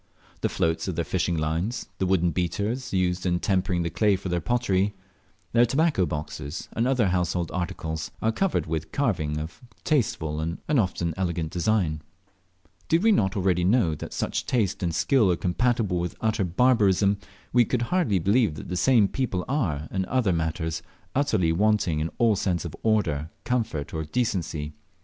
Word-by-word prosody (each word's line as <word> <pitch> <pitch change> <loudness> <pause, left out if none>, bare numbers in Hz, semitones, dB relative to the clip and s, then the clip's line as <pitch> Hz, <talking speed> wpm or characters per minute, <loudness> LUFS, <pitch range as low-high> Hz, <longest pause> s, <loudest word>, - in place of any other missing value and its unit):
The - - +1
floats 80 +3 0
of 95 - -2
their 85 0 -1
fishing 90 -2 0
lines, 80 +10 -2
the 95 - +1
wooden 90 -2 +2
beaters 105 - -2
used 90 -1 0
in 90 -1 +1
tempering 90 -2 0
the 85 - -2
clay 105 +3 +3
for 95 0 -5
their 85 0 0
pottery, 105 -3 +1 0.6
their 120 0 +6
tobacco 135 - +2
boxes, 75 0 -5
and 115 +2 +1
other 125 -7 +2
household 90 -1 0
articles, 80 -3 -3
are 110 - +1
covered 195 - 0
with 80 0 -3
carving 85 - 0
of 80 +2 -6 0.2
tasteful 80 - 0
and 80 +2 -2
often 95 - +1
elegant 85 -4 -2
design. 90 -5 0 0.9
Did 165 +4 +3
we 225 - +5
not 95 - +2
already 90 -2 +2
know 95 -3 +3
that 75 - -7
such - - -2
taste 110 -7 0
and 85 -3 -1
skill 115 -9 +3
are - - +2
compatible 100 +1 0
with 85 -1 -3
utter 110 -2 +1
barbarism, 100 -1 +3 0.3
we 120 0 +6
could 120 +1 -1
hardly 170 - +2
believe 100 0 +2
that 75 - -8
the 90 - -2
same 110 +2 +4
people 100 -7 -2
are, 85 - -1
in 95 -1 -1
other 115 -4 +1
matters, 80 0 -2 0.3
utterly 130 - +2
wanting 95 -3 +2
in 80 +2 -1
all 115 -3 +4
sense 90 -4 -1
of 85 - -6
order, 80 -9 +1
comfort, 110 -12 -2
or 80 -1 -2
decency. 80 -5 -2
95 Hz, 170 wpm, -26 LUFS, 85-115 Hz, 0.9 s, their